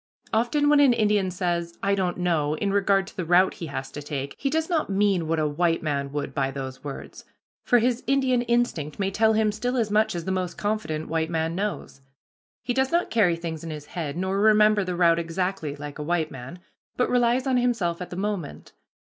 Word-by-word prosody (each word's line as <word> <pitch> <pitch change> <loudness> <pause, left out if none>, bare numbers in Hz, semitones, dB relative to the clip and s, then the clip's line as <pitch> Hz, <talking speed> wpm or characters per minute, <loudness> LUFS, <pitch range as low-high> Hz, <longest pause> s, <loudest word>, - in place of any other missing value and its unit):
Often, 240 +7 +2
when 295 0 +5
an 275 -4 +6
Indian 210 -4 +2
says, 175 -2 -2
"I 200 0 +2
don't 185 -3 0
know," 160 -4 0
in 200 +4 -1
regard 195 -1 +2
to - - -13
the 185 - -3
route 180 +3 +4
he 165 - -7
is 135 -2 -5
to 145 - -7
take, 140 -1 -5
he 275 - 0
does 320 +2 0
not 330 - 0
mean 195 -4 +1
what 165 +1 0
a 155 - +1
white 165 +3 0
man 140 -2 -2
would 145 -1 -4
by 135 0 0
those 135 -1 -7
words, 140 -2 -8 0.4
for 245 - +4
his 240 +1 +1
Indian 265 -3 +2
instinct 235 -11 -1
may 195 -1 -1
tell 220 +2 +3
him 215 -1 +2
still 245 +5 -2
as 220 -3 0
much 215 -2 +2
as 170 -1 -4
the 190 - -1
most 180 -2 -2
confident 205 -7 -2
white 160 0 -1
man 165 0 -1
knows. 195 -7 -4 0.6
He 245 0 -1
does 265 +1 +1
not 345 +1 +1
carry 200 -7 +3
things 165 -2 -6
in 165 - -6
his 150 -2 -7
head, 155 -3 -5
nor 190 +2 -1
remember 215 -1 +5
the 180 -1 -3
route 170 -1 +4
exactly, 170 -2 -2
like 145 0 -8
a - - -3
white 165 0 -1
man, 135 +6 -8 0.4
but 250 - +2
relies 245 +1 +2
on 260 -2 +2
himself 225 -9 0
at 180 - -5
the - - -7
moment. 195 -5 -4
185 Hz, 220 wpm, -25 LUFS, 160-220 Hz, 0.6 s, an